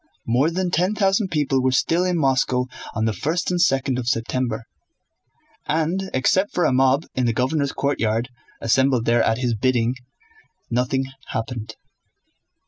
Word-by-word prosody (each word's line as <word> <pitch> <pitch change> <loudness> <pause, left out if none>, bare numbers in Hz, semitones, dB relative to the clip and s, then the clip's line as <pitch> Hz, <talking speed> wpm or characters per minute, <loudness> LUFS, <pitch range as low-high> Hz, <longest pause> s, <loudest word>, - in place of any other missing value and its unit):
More 125 +7 +2
than 180 +1 -2
ten 180 +5 +1
thousand 195 0 +2
people 145 -5 +1
were 130 0 +2
still 165 +7 +2
in 180 -1 0
Moscow 130 -3 +1 0.3
on 110 - 0
the 110 - +1
first 170 +9 -1
and 175 -1 +1
second 135 -4 +2
of 120 - -5
September, 115 -1 -1 1.0
and 170 +5 0
except 185 +10 +1
for 175 - +2
a - - +2
mob 135 +3 +3
in 125 -2 0
the 115 - +1
governor's 140 +4 0
courtyard, 120 -4 -1 0.3
assembled 130 +1 +2
there 120 0 +3
at 110 0 +2
his 125 -2 0
bidding, 120 +1 +1 0.8
nothing 125 +2 0 0.2
happened. 115 -1 -5
130 Hz, 150 wpm, -22 LUFS, 120-160 Hz, 1.0 s, mob